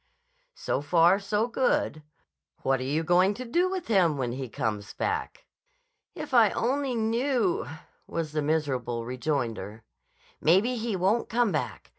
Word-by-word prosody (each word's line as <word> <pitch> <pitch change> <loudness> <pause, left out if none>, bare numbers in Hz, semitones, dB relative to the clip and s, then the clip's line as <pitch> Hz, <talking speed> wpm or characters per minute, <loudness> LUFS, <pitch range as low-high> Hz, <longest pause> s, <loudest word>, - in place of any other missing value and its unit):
"So 135 - -2
far, 170 +5 +4
so 210 +2 0
good. 245 -10 0 0.6
What 135 -1 +2
are - - -3
you 150 +5 -1
going 180 +4 +3
to 255 - -6
do 350 +10 +1
with 375 -1 -3
him 180 -9 +3
when 125 -3 -2
he 130 0 -5
comes 105 -2 -3
back?" - - -3 0.7
"If 305 -5 -7
I 230 -4 +6
only 265 +4 -1
knew!" 230 -2 0 0.4
was 165 -2 -3
the 155 0 -1
miserable 130 -6 -1
rejoinder. 120 -5 -3 0.6
"Maybe 195 +10 +3
he 225 -2 -2
won't 195 +6 +1
come 235 -2 +2
back. 150 - -4
175 Hz, 145 wpm, -27 LUFS, -, 0.7 s, I